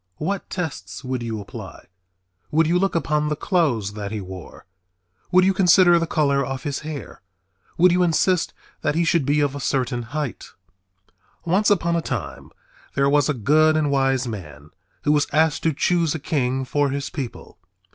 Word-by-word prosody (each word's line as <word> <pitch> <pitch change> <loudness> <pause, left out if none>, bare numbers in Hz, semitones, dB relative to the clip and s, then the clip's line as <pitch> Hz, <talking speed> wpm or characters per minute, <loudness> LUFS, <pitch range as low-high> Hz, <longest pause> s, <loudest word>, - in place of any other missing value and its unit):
What 195 +5 -3
tests 135 - -5
would 130 -1 -3
you 115 -2 -4
apply? 100 - -10 0.6
Would 160 +2 +3
you 175 +3 +2
look 195 -1 0
upon 150 -2 0
the 150 - 0
clothes 140 - 0
that 105 -1 -5
he 110 - -3
wore? 95 -2 -10 0.7
Would 185 0 +5
you 195 - +3
consider 180 -2 +5
the 165 - -1
color 140 -3 +1
of 135 0 -5
his 145 -2 -3
hair? 150 -2 -8 0.6
Would 180 +1 +6
you 180 +1 +2
insist 180 +1 +2 0.3
that - - 0
he 170 - +2
should 165 -5 +1
be 145 +1 +2
of 145 -2 +1
a 145 - -5
certain 130 -3 -1
height? 145 +2 -5 0.9
Once 190 +5 +2
upon 170 -4 +2
a 170 - +1
time - - -5 0.5
there 140 0 +2
was 145 -1 +3
a 150 - +1
good 155 +7 +3
and 150 -2 +1
wise 135 -2 +1
man 75 -9 -8 0.3
who 145 - +2
was 150 -1 +2
asked 155 +1 +2
to 160 - +2
choose 165 +1 +1
a - - -3
king 130 -3 -1
for 145 +2 +1
his 140 +1 -4
people. 135 -6 -7
145 Hz, 180 wpm, -22 LUFS, 130-165 Hz, 0.9 s, Would